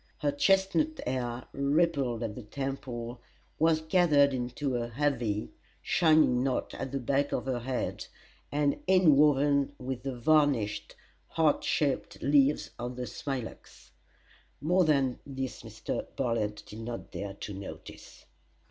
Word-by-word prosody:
Her 145 -2 0
chestnut 195 - +2
hair, 125 -1 -2
rippled 140 -4 +1
at 110 -2 -3
the 125 - -8
temples, 125 0 -5 0.4
was 160 0 +3
gathered 160 -4 +4
into 125 +2 -2
a 120 -1 -1
heavy, 120 -6 -1 0.3
shining 155 -7 +4
knot 130 -2 -1
at 135 - -5
the 140 - -2
back 140 +3 0
of - - -2
her 130 -2 -1
head, 125 +1 -3 0.4
and 145 -1 +1
inwoven 145 -5 +4
with 130 -1 -5
the 135 -1 -4
varnished, 120 -7 +2 0.3
heart 160 -3 +2
shaped 140 -3 0
leaves 140 +1 +3
of 120 +1 -4
the 125 0 -4
smilax. 130 -3 -7 0.7
More 175 +5 +3
than 135 -5 +2
this 135 -2 -5
Mr. 115 -1 -5
Bartlett 115 -5 -1
did 105 - -10
not 115 +1 -6
dare 100 -1 -5
to 105 - -7
notice. 100 0 -10
135 Hz, 130 wpm, -29 LUFS, 120-150 Hz, 0.7 s, gathered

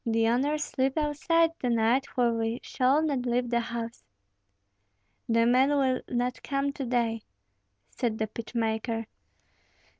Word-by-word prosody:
The 225 -2 +1
owners 290 +5 +1
sleep 270 +1 -1
outside 320 +2 +2
to 250 - -1
night, 235 +3 +2
for 240 -2 +1
we 225 +1 -1
shall 270 +4 +2
not 275 -5 -1
leave 245 0 0
the 235 - +3
house." 235 0 -5 1.3
"The 230 0 +4
men 255 +3 +4
will 265 -3 +2
not 245 0 -1
come 275 0 -1
to 275 -2 -4
day," 235 -2 0 0.7
said 230 -3 -2
the 220 - 0
pitch 225 +2 -9
maker. 225 0 -1
245 Hz, 145 wpm, -28 LUFS, 230-275 Hz, 1.3 s, The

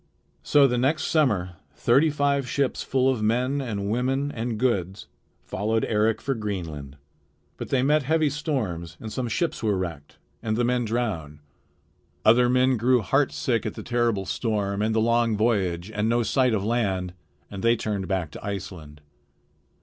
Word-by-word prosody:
So 145 -1 +5
the 125 -2 +1
next 145 +4 +1
summer 105 - +1 0.2
thirty 135 - +3
five 140 -3 0
ships 140 0 0
full 130 0 +1
of 130 -4 +1
men 125 +6 +1
and 105 -6 -3
women 130 +6 0
and 115 -2 -3
goods 100 -6 -1 0.4
followed 110 +3 -1
Eric 110 0 +1
for 135 +2 0
Greenland. 85 - -5 0.6
But - - -6
they 130 -2 +2
met 150 +3 +3
heavy 155 +1 +1
storms, 110 - -3
and 110 -1 -7
some 130 -2 -2
ships 170 +8 -1
were 105 -4 +1
wrecked, 85 -6 -6 0.2
and 110 -1 -1
the 120 - +1
men 120 0 +1
drowned. 105 -11 -2 0.9
Other 120 +2 +5
men 130 0 +3
grew 125 +1 +3
heartsick 130 0 +1
at - - -4
the - - -7
terrible 120 -5 0
storm 100 -3 -1
and 110 +1 0
the - - +3
long 115 -1 +2
voyage 100 -4 0
and 105 +1 -1
no 120 0 +2
sight 125 -1 +2
of 100 -1 -2
land, 95 -6 -1 0.4
and 100 -2 -6
they 115 0 +4
turned 105 -4 -3
back 95 -6 -2
to - - -10
Iceland. 85 -7 -7
115 Hz, 165 wpm, -25 LUFS, 100-130 Hz, 0.9 s, So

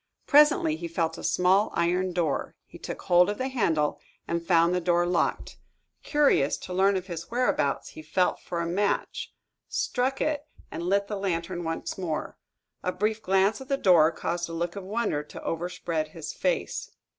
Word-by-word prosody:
Presently 290 - +5
he 170 +1 -5
felt 165 -1 -2
a - - -9
small 190 +3 +3
iron 180 +2 +1
door. 170 -5 -1
He - - -14
took - - -6
hold 180 +1 +5
of 205 - -2
the 260 +1 -2
handle 160 - +1 0.3
and 170 0 -1
found 170 0 +4
the 180 - 0
door 175 0 +2
locked. 175 -1 -1 0.4
Curious 285 - +3
to 180 - -8
learn 195 +2 +3
his 170 -3 -7
whereabouts, 235 - 0
he - - -10
felt 180 +4 0
for 170 -1 -4
a - - -1
match, 195 +4 -1 0.4
struck 260 +2 -1
it, 300 -1 -1 0.2
and - - -5
lit 200 +3 +1
the 205 0 -4
lantern 175 -2 -2
once 165 +3 -4
more. 165 -5 -3 0.5
A 185 - -1
brief 215 +4 -1
glance 195 +4 +2
at 265 - -9
the 275 - +1
door 170 - +5
caused 170 +1 -3
a - - -6
look 170 +1 -2
of 200 - -6
wonder 205 -6 -1
to 150 - -11
overspread 165 -2 -2
his 155 0 -7
face. - - -1
180 Hz, 180 wpm, -27 LUFS, 170-205 Hz, 0.5 s, Presently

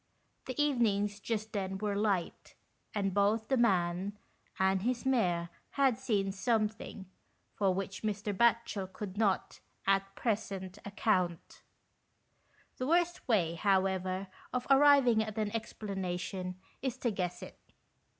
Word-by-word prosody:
The 255 +2 -4
evenings 215 -8 +2
just 220 0 -3
then 190 -2 -2
were 205 0 -1
light, 200 -4 -1 0.4
and 195 -2 0
both 210 +3 +2
the 270 - +3
man 190 -3 +1 0.4
and 190 0 +2
his 245 +3 -1
mare 180 -10 +1 0.3
had 265 -4 +3
seen* 205 -7 0
something 215 -1 -1 0.5
for 195 -2 +2
which 190 +1 -3
Mr. 210 -1 -2
Batchel 225 -3 +2
could 195 -2 -6
not, 205 -3 0 0.3
at 195 0 +1
present, 200 -4 -2
account. 185 -4 -1 1.2
The 255 - -2
worst 345 +2 +1
way, 185 -9 +2
however, 190 0 +1 0.2
of 250 -1 -2
arriving 270 -5 +6
at 215 -1 -4
an 215 0 -1
explanation 190 -4 -4 0.3
is 260 -2 -2
to 245 -2 0
guess 180 -3 -3
it. - - -11
205 Hz, 125 wpm, -32 LUFS, 190-230 Hz, 1.2 s, arriving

